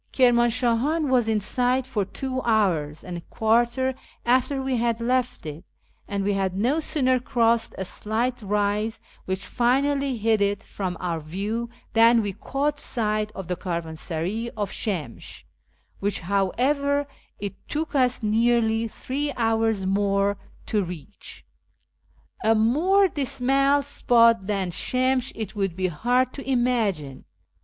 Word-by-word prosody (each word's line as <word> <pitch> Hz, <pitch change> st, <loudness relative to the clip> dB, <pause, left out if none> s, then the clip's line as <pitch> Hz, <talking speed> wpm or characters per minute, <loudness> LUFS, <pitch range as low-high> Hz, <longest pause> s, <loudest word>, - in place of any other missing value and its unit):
Kirmanshahan 250 Hz, +4 st, +2 dB
was 245 Hz, -4 st, +3 dB
in 220 Hz, -1 st, +2 dB
sight 250 Hz, +5 st, 0 dB
for 250 Hz, -6 st, -1 dB
two 260 Hz, +5 st, -4 dB
hours 175 Hz, -11 st, +1 dB
and 180 Hz, -1 st, -6 dB
a -, -, -7 dB
quarter 240 Hz, +7 st, +1 dB, 0.3 s
after 255 Hz, +3 st, +2 dB
we 265 Hz, -1 st, -1 dB
had 235 Hz, 0 st, 0 dB
left 250 Hz, -3 st, -1 dB
it, 155 Hz, +2 st, -7 dB, 0.4 s
and 200 Hz, -1 st, -2 dB
we 205 Hz, +1 st, +1 dB
had 190 Hz, -1 st, -1 dB
no 255 Hz, +10 st, +2 dB
sooner 260 Hz, -5 st, +1 dB
crossed 235 Hz, -2 st, +1 dB
a 190 Hz, -, -3 dB
slight 230 Hz, +6 st, -1 dB
rise 210 Hz, +2 st, 0 dB, 0.3 s
which 190 Hz, +1 st, -3 dB
finally 275 Hz, +2 st, +1 dB
hid 220 Hz, -1 st, +2 dB
it 200 Hz, +1 st, 0 dB
from 185 Hz, -3 st, -4 dB
our 170 Hz, -2 st, -2 dB
view 205 Hz, +9 st, -3 dB, 0.2 s
than 230 Hz, 0 st, +5 dB
we 200 Hz, -1 st, -3 dB
caught 290 Hz, +7 st, -2 dB
sight 215 Hz, -4 st, -1 dB
of 195 Hz, -4 st, -7 dB
the 180 Hz, -, -1 dB
caravansaray 170 Hz, +5 st, -3 dB
of 205 Hz, -2 st, -2 dB
Shemsh, 170 Hz, -, -4 dB, 0.6 s
which, 200 Hz, -1 st, -1 dB
how 195 Hz, +2 st, +1 dB
ever, 285 Hz, +2 st, +1 dB, 0.3 s
it 200 Hz, 0 st, -5 dB, 0.2 s
took 315 Hz, +1 st, -3 dB
us 255 Hz, -3 st, +2 dB
nearly 225 Hz, +1 st, +2 dB
three 285 Hz, +6 st, -3 dB
hours 225 Hz, -3 st, +1 dB
more 200 Hz, +1 st, +1 dB, 0.3 s
to 210 Hz, -2 st, 0 dB
reach. 180 Hz, +3 st, -9 dB, 1.0 s
A 225 Hz, +1 st, +4 dB
more 325 Hz, -, +4 dB
dismal 275 Hz, -1 st, +1 dB
spot 230 Hz, -6 st, +3 dB
than 195 Hz, -4 st, -1 dB
Shemsh 255 Hz, +5 st, +1 dB
it 220 Hz, -2 st, -5 dB
would 195 Hz, -4 st, -1 dB
be 185 Hz, 0 st, 0 dB
hard 245 Hz, +9 st, +1 dB
to 275 Hz, -1 st, -7 dB
imagine. 220 Hz, -, 0 dB
225 Hz, 140 wpm, -24 LUFS, 200-255 Hz, 1.0 s, than